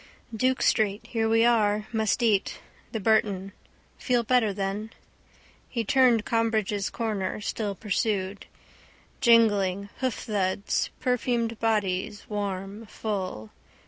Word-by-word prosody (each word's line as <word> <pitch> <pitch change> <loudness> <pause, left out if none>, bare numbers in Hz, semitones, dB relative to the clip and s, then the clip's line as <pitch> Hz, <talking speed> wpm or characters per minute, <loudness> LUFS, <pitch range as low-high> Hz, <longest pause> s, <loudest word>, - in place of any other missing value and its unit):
Duke 255 +3 +1
street. 215 0 +1
Here 225 -2 -1
we 225 +1 +4
are. 210 -3 +2
Must 220 +2 +1
eat. 210 -4 +1 0.3
The 225 - -3
Burton. 200 -2 +1 0.5
Feel 245 -2 +1
better 230 -2 +3
then. 200 +2 -3 0.8
He 235 - -2
turned 240 -1 +4
Combridge's 220 -3 0
corner, 210 -4 -2
still 210 -1 -3
pursued. 200 -1 -2 0.7
Jingling, 205 -5 +3
hoofthuds. 205 -6 -1
Perfumed 235 -2 0
bodies, 205 -3 -1
warm, 200 +1 -4
full. 185 - -4
215 Hz, 105 wpm, -26 LUFS, 200-230 Hz, 0.8 s, we